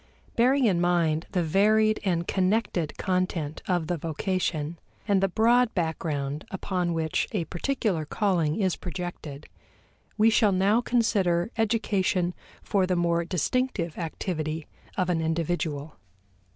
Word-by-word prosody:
Bearing 260 Hz, +3 st, +4 dB
in 180 Hz, -6 st, +2 dB
mind 170 Hz, -3 st, +1 dB
the 180 Hz, -, +1 dB
varied 215 Hz, +6 st, +3 dB
and 175 Hz, -4 st, 0 dB
connected 185 Hz, -4 st, 0 dB
content 180 Hz, -5 st, -1 dB
of 175 Hz, -3 st, +1 dB
the 175 Hz, +2 st, -1 dB
vocation, 165 Hz, -1 st, -2 dB, 0.3 s
and 200 Hz, -2 st, +3 dB
the 195 Hz, -, +3 dB
broad 235 Hz, +5 st, +3 dB
background 155 Hz, -4 st, -2 dB
upon 180 Hz, -2 st, -2 dB
which 160 Hz, -1 st, 0 dB
a 180 Hz, -6 st, -1 dB
particular 190 Hz, -, -1 dB
calling 170 Hz, -2 st, 0 dB
is 190 Hz, -4 st, +1 dB
projected, 175 Hz, -5 st, -6 dB, 0.7 s
we 225 Hz, +1 st, +5 dB
shall 215 Hz, -2 st, +4 dB
now 195 Hz, +5 st, +3 dB
consider 215 Hz, -6 st, +1 dB
education 205 Hz, -5 st, +1 dB, 0.3 s
for 195 Hz, -3 st, +1 dB
the 180 Hz, -, +1 dB
more 170 Hz, -1 st, +1 dB
distinctive 180 Hz, -, -1 dB
activity 160 Hz, -2 st, -3 dB, 0.3 s
of 185 Hz, -2 st, +1 dB
an 170 Hz, -2 st, +1 dB
individual. 160 Hz, -2 st, -2 dB
180 Hz, 125 wpm, -27 LUFS, 160-205 Hz, 0.7 s, we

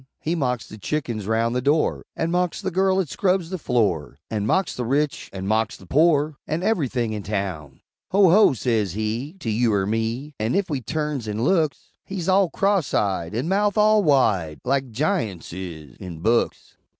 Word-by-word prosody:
He 160 Hz, -, -2 dB
mocks 125 Hz, -8 st, -1 dB
the 110 Hz, -, -11 dB
chickens 115 Hz, -6 st, -3 dB
round 115 Hz, +2 st, +1 dB
the 125 Hz, -, +1 dB
door, 150 Hz, +4 st, +1 dB
An' 165 Hz, +1 st, -1 dB
mocks 180 Hz, -1 st, 0 dB
the 190 Hz, -, -3 dB
girl 190 Hz, +1 st, +2 dB
'at 185 Hz, -, 0 dB
scrubs 185 Hz, +2 st, 0 dB
the 185 Hz, -, -3 dB
floor, 90 Hz, -, 0 dB
An' 105 Hz, -1 st, -1 dB
mocks 190 Hz, +9 st, +1 dB
the 125 Hz, -, -3 dB
rich, 140 Hz, +4 st, -1 dB
an' 95 Hz, -1 st, -6 dB
mocks 110 Hz, +2 st, 0 dB
the 95 Hz, -, -15 dB
pore, 150 Hz, -, +3 dB
An' 160 Hz, +3 st, -2 dB
ever'thing 130 Hz, -, 0 dB
in 105 Hz, -, -4 dB
town! 95 Hz, -9 st, -4 dB, 0.3 s
"Ho! 190 Hz, -2 st, +5 dB
ho!" 205 Hz, -5 st, +6 dB
says 110 Hz, -6 st, 0 dB
he, 110 Hz, -, -3 dB
To 115 Hz, -, -2 dB
you 115 Hz, +1 st, +2 dB
er 95 Hz, -1 st, +1 dB
me; 115 Hz, +7 st, -2 dB
An' 110 Hz, +3 st, 0 dB
ef 195 Hz, -4 st, 0 dB
we 140 Hz, -3 st, -1 dB
turns 150 Hz, -1 st, -3 dB
an' 105 Hz, +2 st, -2 dB
looks, 160 Hz, -1 st, 0 dB
He's 190 Hz, -3 st, -5 dB
all 190 Hz, -1 st, +4 dB
cross 195 Hz, -3 st, +1 dB
eyed 95 Hz, -2 st, 0 dB
An' 125 Hz, +7 st, -1 dB
mouth 205 Hz, +3 st, +1 dB
all 215 Hz, 0 st, +5 dB
wide 105 Hz, -, +2 dB
Like 135 Hz, -1 st, 0 dB
Giunts 115 Hz, -, -2 dB
is, 80 Hz, -7 st, -8 dB
in 85 Hz, -3 st, -8 dB
books. 115 Hz, +5 st, 0 dB
125 Hz, 190 wpm, -23 LUFS, 105-165 Hz, 0.3 s, ho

